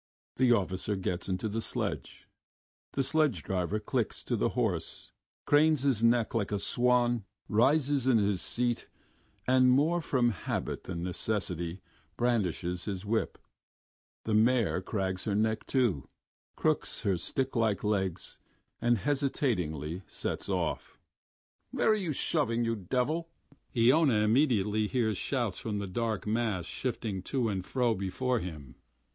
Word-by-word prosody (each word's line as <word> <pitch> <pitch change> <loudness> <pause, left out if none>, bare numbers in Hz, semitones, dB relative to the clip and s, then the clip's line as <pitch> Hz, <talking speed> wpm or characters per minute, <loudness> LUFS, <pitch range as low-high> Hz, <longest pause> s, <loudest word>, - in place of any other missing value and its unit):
The 130 -1 +4
officer 100 -1 +1
gets 90 -1 -3
into 95 +4 -1
the 110 +2 -2
sledge. - - -4 0.7
The 135 - +1
sledge 145 - +2
driver 95 +2 -1
clicks 120 -1 -2
to - - -1
the - - +1
horse, - - -2 0.3
cranes 150 -1 +4
his 130 -6 +2
neck 115 -1 +3
like 105 -4 -1
a 105 - +1
swan, 120 +1 +2 0.2
rises 135 +4 +2
in 125 -3 +5
his 100 -3 +1
seat, 120 -1 0 0.6
and 130 0 +5
more 155 +7 +3
from 125 -5 +2
habit 100 - -4
than 85 -2 -4
necessity 90 -2 -2 0.4
brandishes 90 -7 0
his 100 -2 -4
whip. 110 +2 -1 0.9
The 110 - -2
mare 115 -3 +3
cranes 95 -2 -2
her 100 - 0
neck, 110 +1 0
too, 120 - +1 0.5
crooks - - 0
her 100 -2 +1
stick 130 +10 -1
like 110 -4 +1
legs, 95 -4 -1 0.4
and 120 0 +3
hesitatingly 95 - -1
sets - - -3
of.... - - -2 0.7
"Where - - +1
are - - +4
you 190 -6 -2
shoving, 125 -5 0
you 115 0 0
devil?" 130 - -1 0.5
Iona 125 -1 +5
immediately 110 -3 +2
hears 110 -4 0
shouts 120 -9 -1
from 105 -2 -3
the 100 - -3
dark 110 +2 -2
mass 105 -5 0
shifting 110 -1 -3
to 125 -1 -1
and 95 -3 -2
fro 120 +3 +1
before 110 +6 -1
him. 75 - -7
110 Hz, 140 wpm, -30 LUFS, 95-125 Hz, 0.9 s, in